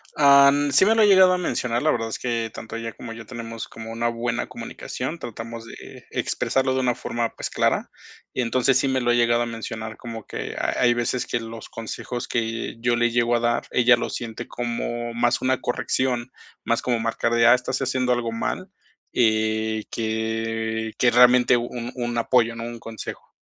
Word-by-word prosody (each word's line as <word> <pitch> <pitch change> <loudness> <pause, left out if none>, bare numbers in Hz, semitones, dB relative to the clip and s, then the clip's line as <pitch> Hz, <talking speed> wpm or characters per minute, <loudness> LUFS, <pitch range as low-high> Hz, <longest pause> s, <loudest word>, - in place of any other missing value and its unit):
Am, 140 0 +6
sí 140 +8 +6
me 220 - +4
lo 225 - +4
ha - - +7
llegado 190 -2 +7
a 180 - +1
mencionar, 125 -7 -1
la 155 - +4
verdad 115 -1 -1
es - - -3
que 115 -2 -2
tanto 110 - -8
ella 115 -1 -5
como 115 -2 -8
yo 115 0 -10
tenemos 115 -2 -6
como 115 0 -9
una 115 +1 -1
buena 120 +1 -2
comunicación, 150 +7 -6
tratamos 115 -1 -7
de - - -12
expresarlo 130 0 0
de 130 - 0
una 125 -2 +1
forma, 115 -1 -2
pues, - - -4
clara, - - 0 0.4
y - - -1
entonces, 125 +2 +2
sí 135 - +1
me 130 -1 +1
lo 120 0 +2
ha - - +4
llegado 120 0 +3
a - - -2
mencionar 110 -1 -6
como 115 -3 -8
que - - -6
ha - - -1
hay 120 -1 +5
veces 120 +1 -1
que 120 - -1
los 115 -1 -8
consejos 120 +2 -5
que 115 0 -2
yo 120 0 +2
le 120 0 +2
llego 120 0 +2
a - - +2
dar, 120 0 +1
ella 120 0 +5
lo - - -3
siente 115 -2 -6
como 120 0 -3
más 120 +1 +1
una 130 0 +1
corrección, 125 0 -1 0.3
más 115 - 0
como 120 -2 0
marcar 115 +1 -1
de: 115 0 +4
"Ah, 120 - +8
estás 125 +1 -1
haciendo 130 -1 0
algo 120 -2 0
mal", 115 - -3 0.4
eh, 110 -1 +1
que 110 0 -2
que 120 - +4
realmente 125 0 +6
un 120 0 -4
un 120 -1 -3
apoyo, 115 -1 +2
¿no?, 115 - -6
un 120 0 -6
consejo. 115 -1 -8
120 Hz, 200 wpm, -24 LUFS, 115-125 Hz, 0.4 s, Ah